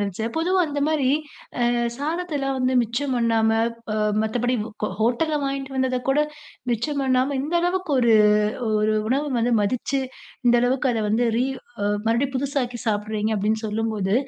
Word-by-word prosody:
நினைச்சேன். 205 +3 -3
பொதுவா 365 +3 +2
அந்தமாரி, 285 -2 +1 0.6
அ - - +3 0.3
சாதத்தெல்லாம் 295 -3 -2
வந்து 255 0 +1
மிச்சம் 255 +4 -2
பண்ணாம, 225 -2 +2 0.4
அ - - -1 0.3
மத்தபடி 245 +3 0
ஹோ 215 -1 -5
ஹோட்டல்ல 250 +8 +1
வாங்கிட்டு 275 0 -3
வந்தத 260 -1 +1
கூட 280 +2 +3 0.5
மிச்சம் 280 +5 -1
பண்ணாம, 265 +1 +1
இந்த 305 +5 -3
அளவுக்கு 360 0 -1
1, 235 -2 +4 0.7
1 215 0 +2
உணவ 275 +4 +1
வந்து 240 +1 +1
மதிச்சு, 255 +5 -1 0.5
இந்த 240 - +5
அளவுக்கு 255 +2 +1
அத 225 - -1
வந்து, 230 +3 +2
ரீ 245 - +2 0.4
அ - - +1 0.2
மறுபடியும் 260 +4 +1
புதுசாக்கி 255 -3 -2
சாப்பிடுறீங்க, 215 0 -1
அப்பிடின்னு 215 +2 0
சொல்லும்போது 215 -2 -1
255 Hz, 145 wpm, -23 LUFS, 225-280 Hz, 0.7 s, இந்த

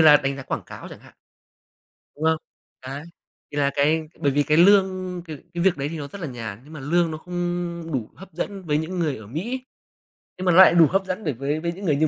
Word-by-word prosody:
là 150 -2 +9
đánh 135 -1 -2
giá 140 - -6
quảng - - -3
cáo - - -9
chẳng - - -11
hạn. - - -18 1.0
Đúng 150 - -7
không? 160 0 +4 0.5
Đấy. 140 +3 -5 0.5
Thì 145 - -5
là 140 -1 +2
cái 155 +3 +3 0.2
bởi 140 - +2
vì 145 +1 +2
cái 150 +1 +2
lương 185 -1 +4
c - - -25
cái 155 -2 -6 0.3
việc 190 -3 +3
đấy 140 +1 -2
thì 165 - -5
nó 145 -2 -5
rất 195 +6 -10
là 165 - -3
nhàn, 115 -5 -6
nhưng 150 +3 -14
mà 155 - -7
lương 165 +4 +1
nó 155 - -4
không 175 -1 -3
đủ 120 -5 -2
hấp 190 -2 -13
dẫn 195 +3 -4
với 150 -3 +1
những 175 +4 -3
người 150 -7 0
ở 110 - -11
Mỹ. 235 - -4 0.7
Nhưng 185 - -4
mà 180 - +5
nó 170 - +4
lại 190 -2 +9
đủ 165 -2 +8
hấp 195 +1 +1
dẫn 185 +3 -3
được 150 -5 0
với 145 +3 -1
với 170 +1 -1
những 190 +3 -8
người 150 - +3
như 155 +2 +3
160 Hz, 260 wpm, -24 LUFS, 145-180 Hz, 1.0 s, là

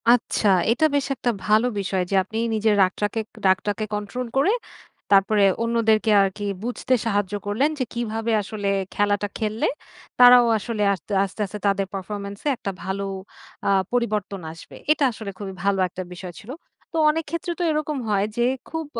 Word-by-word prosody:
আচ্ছা, 235 -2 +3 0.2
এটা 255 +7 +3
বেশ 280 - +1
একটা 245 -1 -1 0.2
ভালো 215 +3 +4
বিষয় 190 -1 -1
যে - - +2
আপনি 220 +4 -7 0.2
নিজের 215 -1 +2
রাগটাকে 205 +4 -1 0.3
রাগটাকে 205 +3 +1
কন্ট্রোল 220 +5 -4
করে 285 +9 +4 0.6
তারপরে 200 +1 +4 0.2
অন্যদেরকে 225 -1 +2
আরকি 195 +1 -1 0.2
বুঝতে 245 +2 -1
সাহায্য 205 -3 0
করলেন 225 +9 +2
যে - - +2
কিভাবে 225 -1 -2
আসলে 205 0 -3 0.3
খেলাটা 205 0 +1
খেললে 215 0 -1 0.5
তারাও 245 0 +9
আসলে 215 0 -2
আস্তে 190 +2 -9
আস্তে, 195 +2 -6
আস্তে, 200 +2 -7
তাদের 195 -1 +1
পারফরম্যান্স 200 +1 -5
এ - - +4
একটা 200 - -4
ভালো 190 +2 -3 0.6
আ - - +3 0.2
পরিবর্তন 210 -5 -1
আসবে। 165 - -13 0.2
এটা 305 - +2
আসলে 220 -3 -7
খুবই 195 -1 -6
ভালো 200 -1 +2
একটা 185 +1 -6
বিষয় 180 0 -8
ছিল। 220 - -14 0.4
তো - - -1
অনেক 325 +2 0
ক্ষেত্রে 335 +3 -3
তো - - 0
এরকম 305 -1 -1
হয় 200 -1 +2
যে 240 - +3 0.2
খুব 320 0 -4
210 Hz, 165 wpm, -23 LUFS, 200-240 Hz, 0.6 s, তারাও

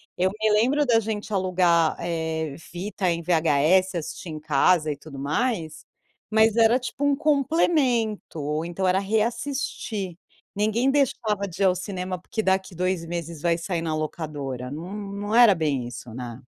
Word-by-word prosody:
Eu 185 +1 +2
me 220 0 +2
lembro 260 +8 +3
da 230 -2 +4
gente 215 -1 -4
alugar, 180 -4 +2
eh, 160 -3 -2
fita 185 +3 -3
em 170 0 -1
VHS, 170 +3 +3
assistir 165 +1 -6
em 155 - -6
casa 155 +2 +3
e - - -3
tudo 140 -1 -11
mais, 160 - -2 0.4
mas 220 0 +4
era 230 +1 +5
tipo 255 +3 -5
um 285 -1 +3
complemento, 275 - +1
ou 150 +2 -2
então 175 +2 -2
era 185 +1 +3
reassistir. 220 - -2 0.4
Ninguém 220 +6 +2
deixava 220 -7 0
de 185 +2 -3
ir - - +5
ao 185 - +5
cinema, 185 -1 -4
porque 220 +4 -3
daqui 190 -1 0
2 180 0 -1
meses 170 -2 -5
vai 170 0 +2
sair 170 -1 -3
na 160 -2 -2
locadora. 145 -5 -4
Não 165 +8 -7
não 205 0 -5
era 235 -5 +7
bem 140 -6 -1
isso, 120 -1 -9
né. 120 0 -7
185 Hz, 165 wpm, -25 LUFS, 160-220 Hz, 0.4 s, era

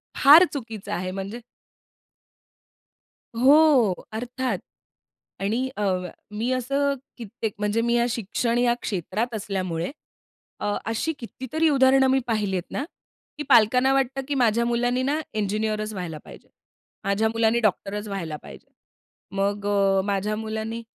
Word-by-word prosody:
फार 300 +5 +8
चुकीचं 225 -7 -6
आहे 185 +1 -3
म्हणजे 195 +5 -6 2.0
हो 275 -6 +6 0.2
अर्थात. 245 -1 -2 0.8
आणि 230 +7 0
अ, 210 - -1 0.5
मी 225 +4 -2
असं 275 +3 0 0.2
कित्येक 220 -1 -5
म्हणजे 210 +2 0
मी 235 0 +1
या 235 - +3
शिक्षण 230 +2 -1
या 245 -1 +3
क्षेत्रात 210 +5 -2
असल्यामुळे 185 -3 -3 0.7
अ, 205 0 -1
अशी 225 +9 -1
कितीतरी 260 +7 -1
उदाहरणं 265 -1 +5
मी 265 +1 +3
पाहिलीत 205 -5 0
ना, 275 - -2 0.5
की 300 - -3
पालकांना 250 +2 +5
वाटतं 270 0 0
की 285 - -1
माझ्या 235 -2 +2
मुलाने 245 +1 +1
ना, 290 +4 0
इंजिनिअरच 215 +1 -1
व्हायला 175 -5 -5
पाहिजे. - - -13 0.6
माझ्या 200 +3 +1
मुलाने 230 +1 +2
डॉक्टरच 210 -1 -1
व्हायला 170 -7 -4
पाहिजे. - - -12 0.7
मग 200 +1 -1
अ, 195 -1 +3
माझ्या 200 +1 -1
मुलानी 220 +1 -4
225 Hz, 125 wpm, -24 LUFS, 205-255 Hz, 2.0 s, फार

